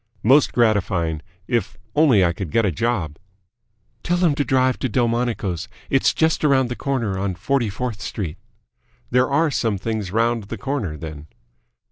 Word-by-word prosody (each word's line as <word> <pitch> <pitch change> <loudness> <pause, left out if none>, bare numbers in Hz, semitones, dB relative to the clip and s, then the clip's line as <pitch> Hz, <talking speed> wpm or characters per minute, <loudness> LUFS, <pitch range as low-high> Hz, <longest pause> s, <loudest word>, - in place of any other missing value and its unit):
"Most 135 +6 +5
gratifying, 95 -9 +1 0.3
if 120 -6 -1 0.2
only 130 -11 +5
I 85 - +1
could 90 -1 -5
get 115 +7 +2
a 100 - +1
job." 90 -7 -1 0.8
"Tell 175 0 0
him 175 -4 +3
to 145 - 0
drive 130 0 +2
to 130 - -1
Delmonico's. 115 -6 -1 0.2
It's 135 - +4
just 160 -1 +1
around 135 -4 +3
the 125 - -3
corner 115 -10 -2
on 95 -1 -2
Forty 120 +5 0
fourth 110 0 -4
Street." 95 -6 -5 0.7
"There 125 +1 +3
are 150 +3 +2
some 115 -5 0
things 110 -1 -3
round 115 0 +1
the - - -6
corner, 125 - -3
then?" 75 -1 -8
115 Hz, 160 wpm, -22 LUFS, 95-130 Hz, 0.8 s, Most